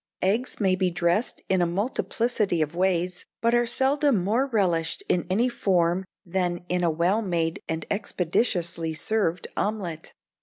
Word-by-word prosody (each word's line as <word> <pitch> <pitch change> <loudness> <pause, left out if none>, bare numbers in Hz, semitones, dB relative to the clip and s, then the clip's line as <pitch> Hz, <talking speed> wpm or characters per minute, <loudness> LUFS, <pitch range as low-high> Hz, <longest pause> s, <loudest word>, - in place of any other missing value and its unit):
"Eggs 220 +7 0
may 190 -3 +3
be 185 -1 +1
dressed 175 +6 0
in 190 -1 +2
a 175 - +3
multiplicity 210 0 0
of 150 +1 -5
ways, 180 0 0
but 230 0 +2
are 240 0 +3
seldom 270 -4 +2
more 230 +8 +1
relished 175 -9 0
in 175 - +1
any 220 +7 +2
form 180 -6 +1 0.2
than 175 -1 -1
in 180 0 +1
a 170 - +3
well 175 +7 +2
made 170 -5 -1
and 160 0 -2
expeditiously 175 -4 0
served 180 -2 -1
omelette. 190 -7 -3
185 Hz, 150 wpm, -26 LUFS, 170-220 Hz, 0.2 s, may